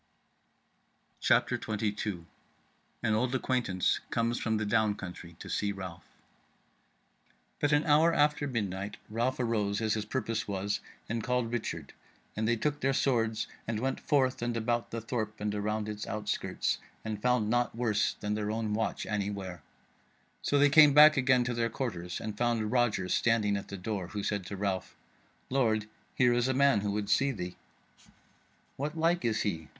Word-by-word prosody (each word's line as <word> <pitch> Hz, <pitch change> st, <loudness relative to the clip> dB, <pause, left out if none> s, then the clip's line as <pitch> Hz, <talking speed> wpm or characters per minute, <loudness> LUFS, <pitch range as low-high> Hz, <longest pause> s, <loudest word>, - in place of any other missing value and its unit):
CHAPTER -, -, +3 dB
22 105 Hz, -4 st, -3 dB, 0.8 s
An 110 Hz, -, +2 dB
Old 125 Hz, +4 st, +1 dB
Acquaintance 120 Hz, -9 st, +1 dB
Comes 115 Hz, +1 st, 0 dB
From 110 Hz, -1 st, 0 dB
the 110 Hz, -, -1 dB
Down 105 Hz, 0 st, +2 dB
Country 90 Hz, -3 st, -9 dB
to -, -, -10 dB
See 100 Hz, -, -1 dB
Ralph 95 Hz, -4 st, -8 dB, 1.5 s
But 145 Hz, -, +1 dB
an 150 Hz, 0 st, +4 dB
hour 155 Hz, +3 st, +5 dB
after 150 Hz, -2 st, +2 dB
midnight 105 Hz, -4 st, -3 dB
Ralph 120 Hz, +4 st, 0 dB
arose, 105 Hz, -4 st, 0 dB
as 110 Hz, -2 st, +1 dB
his 110 Hz, -1 st, -2 dB
purpose 115 Hz, -1 st, -2 dB
was, 100 Hz, +1 st, -1 dB, 0.3 s
and 115 Hz, 0 st, -2 dB
called 125 Hz, -2 st, 0 dB
Richard, 120 Hz, -2 st, -4 dB, 0.4 s
and 110 Hz, +1 st, -1 dB
they 120 Hz, -, +3 dB
took 145 Hz, +5 st, -1 dB
their 135 Hz, -1 st, +1 dB
swords 115 Hz, -5 st, +1 dB, 0.2 s
and 115 Hz, -1 st, -1 dB
went 135 Hz, +3 st, -1 dB
forth 130 Hz, -5 st, +1 dB
and 120 Hz, -1 st, -1 dB
about 120 Hz, +1 st, -1 dB
the 115 Hz, -, -4 dB
thorp 110 Hz, -2 st, -3 dB
and 105 Hz, 0 st, -2 dB
around 105 Hz, +1 st, -2 dB
its 105 Hz, 0 st, -5 dB
outskirts, 105 Hz, -1 st, -2 dB, 0.3 s
and 105 Hz, -2 st, -4 dB
found 125 Hz, -3 st, +2 dB
naught 120 Hz, -1 st, +1 dB
worse 115 Hz, -3 st, +1 dB
than 105 Hz, 0 st, -1 dB
their 105 Hz, -1 st, -2 dB
own 110 Hz, -1 st, -1 dB
watch 110 Hz, +1 st, -1 dB
any 100 Hz, -2 st, -1 dB
where; 95 Hz, -5 st, -6 dB, 0.8 s
so 145 Hz, -, +1 dB
they 145 Hz, +1 st, +6 dB
came 150 Hz, -2 st, +8 dB
back 150 Hz, +1 st, +9 dB
again 130 Hz, -2 st, +3 dB
to 120 Hz, 0 st, -2 dB
their 115 Hz, 0 st, 0 dB
quarters 90 Hz, -8 st, -4 dB
and 105 Hz, -1 st, -6 dB
found 115 Hz, -3 st, +1 dB
Roger 120 Hz, -7 st, +2 dB
standing 110 Hz, -1 st, +2 dB
at 100 Hz, -, -4 dB
the 100 Hz, -, -6 dB
door, 95 Hz, -1 st, -3 dB
who 100 Hz, +2 st, -5 dB
said 100 Hz, -4 st, -2 dB
to 100 Hz, -, -5 dB
Ralph: 95 Hz, -2 st, -2 dB, 0.6 s
"Lord, 110 Hz, -5 st, +2 dB, 0.3 s
here 125 Hz, -1 st, +4 dB
is 120 Hz, +1 st, +2 dB
a 130 Hz, -, +1 dB
man 140 Hz, -6 st, +4 dB
who 105 Hz, -, -1 dB
would 100 Hz, 0 st, -2 dB
see 135 Hz, +6 st, +3 dB
thee." 90 Hz, -6 st, -5 dB, 1.2 s
"What 150 Hz, +4 st, -3 dB
like 170 Hz, +2 st, +2 dB
is 110 Hz, -2 st, +1 dB
he?" 80 Hz, -7 st, -2 dB
110 Hz, 170 wpm, -30 LUFS, 105-125 Hz, 1.5 s, back